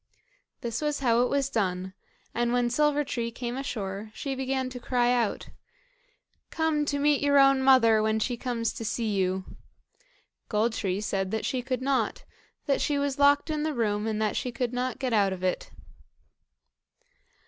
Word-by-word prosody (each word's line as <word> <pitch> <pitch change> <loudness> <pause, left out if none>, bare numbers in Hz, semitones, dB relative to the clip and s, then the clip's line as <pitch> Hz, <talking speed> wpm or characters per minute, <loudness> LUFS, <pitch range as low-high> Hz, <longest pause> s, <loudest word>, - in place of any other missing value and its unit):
This 230 +1 -3
is 295 -2 -1
how 235 -2 +3
it 250 - +2
was 280 -1 +1
done; 190 -6 -2 0.4
and 240 0 0
when 245 -1 +1
Silver 295 +2 +2
tree 235 -4 -3
came 240 +1 -5
ashore, 215 -6 -4
she 275 - -3
began 265 0 -2
to 250 - -7
cry 245 0 +1
out: 235 -4 -1 1.0
"Come 320 -2 0
to 285 0 -1
meet 290 0 +2
your 285 0 +3
own 275 -1 +5
mother, 240 -5 +5
when 220 0 +1
she 240 +3 -1
comes 235 -1 -2
to - - -6
see 225 0 -1
you." 190 -1 0 1.0
Gold 220 +2 +1
tree 195 -2 -2
said 195 -2 -1
that 220 +1 -2
she 255 - -1
could 255 0 -3
not, 260 -5 0 0.4
that 275 - +1
she 290 - +1
was 280 -1 -1
locked 285 +2 +4
in 305 -1 -1
the 310 -1 -1
room, 210 -2 0
and 215 -1 -1
that 215 -1 0
she 250 - -2
could 245 0 -2
not 250 +1 -2
get 255 -3 -2
out 200 -3 +3
of 185 -1 -8
it. 185 -1 -1
245 Hz, 180 wpm, -27 LUFS, 220-275 Hz, 1.0 s, own